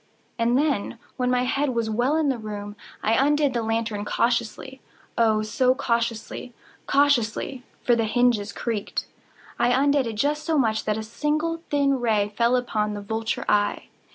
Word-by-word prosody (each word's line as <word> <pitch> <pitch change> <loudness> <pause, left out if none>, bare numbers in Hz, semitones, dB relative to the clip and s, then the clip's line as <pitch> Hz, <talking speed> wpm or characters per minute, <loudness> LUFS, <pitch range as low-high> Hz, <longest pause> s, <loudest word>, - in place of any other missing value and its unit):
And 235 +2 +3
then, 280 -9 0 0.2
when 250 -1 0
my 250 0 +2
head 265 0 0
was 230 -1 0
well 240 +7 +1
in 310 -3 +2
the 260 -3 -1
room, 205 -1 -6 0.3
I 220 - +2
undid 285 +2 +3
the 235 - 0
lantern 225 -2 -1
cautiously—oh, 235 -1 -1
so 255 +4 +2
cautiously—cautiously 240 +1 -1 0.2
(for 240 - +4
the 230 -1 +1
hinges 220 -3 +2
creaked)—I 230 +1 -4
undid 275 +1 +3
it 225 - -3
just 295 +7 0
so 320 -2 0
much 220 -5 +1
that 215 0 0
a 220 - -4
single 305 +8 -1
thin 280 -2 +2
ray 215 -4 +1
fell 235 +2 +3
upon 215 -4 -1
the 205 - -5
vulture 220 +2 -3
eye. 205 0 +1
235 Hz, 155 wpm, -24 LUFS, 220-270 Hz, 0.3 s, for